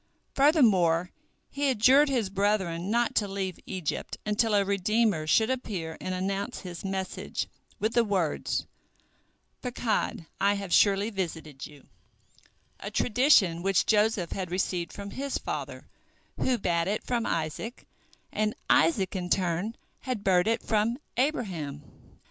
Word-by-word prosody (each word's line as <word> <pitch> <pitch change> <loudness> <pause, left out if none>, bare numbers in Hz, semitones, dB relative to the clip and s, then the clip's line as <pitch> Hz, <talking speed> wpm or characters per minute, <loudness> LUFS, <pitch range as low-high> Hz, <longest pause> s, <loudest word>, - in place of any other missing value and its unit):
Furthermore, 195 - +4 0.4
he 285 0 0
adjured 265 +5 +5
his 235 -8 0
brethren 195 -3 0
not 235 +2 +1
to 205 - +1
leave 195 -2 -4
Egypt 180 -6 -4
until 210 +1 +2
a 200 -1 +3
redeemer 200 -3 +1
should 220 +8 +3
appear 185 -11 -4
and 185 - -3
announce 195 +2 -3
his 175 -3 -8
message 190 -1 -3 0.3
with 215 +2 0
the 235 - +4
words, 190 -8 -1 1.0
"Pakod— 240 -8 -1
I 200 +1 +3
have 200 -3 -4
surely 200 +2 +4
visited 160 -7 -5
you"—a 110 -7 -16
tradition 215 - +3
which 195 0 +2
Joseph 210 -5 +2
had 185 -3 -3
received 180 -1 -1
from 200 0 -7
his 275 +4 -3
father, - - -5 0.5
who 255 -2 +1
bad 170 -4 0
it 210 +2 -1
from 240 -2 -1
Isaac, 165 +9 -3 0.5
and 215 0 0 0.2
Isaac 180 +4 +3
in 180 -1 -3
turn 185 +5 0 0.2
had 250 -6 -4
beard 180 0 +3
it 225 +1 +1
from 220 +2 +1 0.2
Abraham. 185 - -2
195 Hz, 130 wpm, -28 LUFS, 175-225 Hz, 1.0 s, adjured